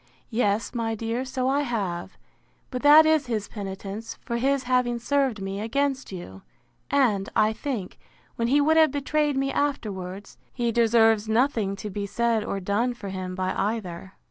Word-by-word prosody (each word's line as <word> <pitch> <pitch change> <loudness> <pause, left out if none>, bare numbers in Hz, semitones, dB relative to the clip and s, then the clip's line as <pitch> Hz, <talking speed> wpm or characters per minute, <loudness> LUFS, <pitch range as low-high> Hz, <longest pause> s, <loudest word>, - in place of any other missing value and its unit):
—Yes, 220 -2 0
my 225 -2 -1
dear, 230 +3 -2
so 255 0 -2
I 275 +2 +2
have; 200 -10 -3 0.5
but 250 -2 -3
that 300 +2 +8
is 315 -3 +3
his 215 -4 -2
penitence 200 +1 -6
for 235 -2 -4
his 270 +2 +1
having 250 -1 +1
served 265 -2 0
me 195 +1 -4
against 270 +4 -1
you; 95 - -8 0.5
and, 225 -9 +2
I 215 +1 +3
think, 225 -7 -5 0.4
when 230 - 0
he 280 +4 +4
would 315 +2 +3
have 315 -1 +6
betrayed 290 +1 0
me 275 0 0
afterwards, 200 -9 -3
he 235 -2 -1
deserves 225 -2 +3
nothing 220 -4 +1
to 210 +1 -6
be 200 +1 -3
said 230 +1 +1
or 200 - -3
done 210 +6 0
for 200 -4 -7
him 185 -1 -5
by 185 0 -1
either. 190 -3 -3
230 Hz, 170 wpm, -25 LUFS, 200-265 Hz, 0.5 s, that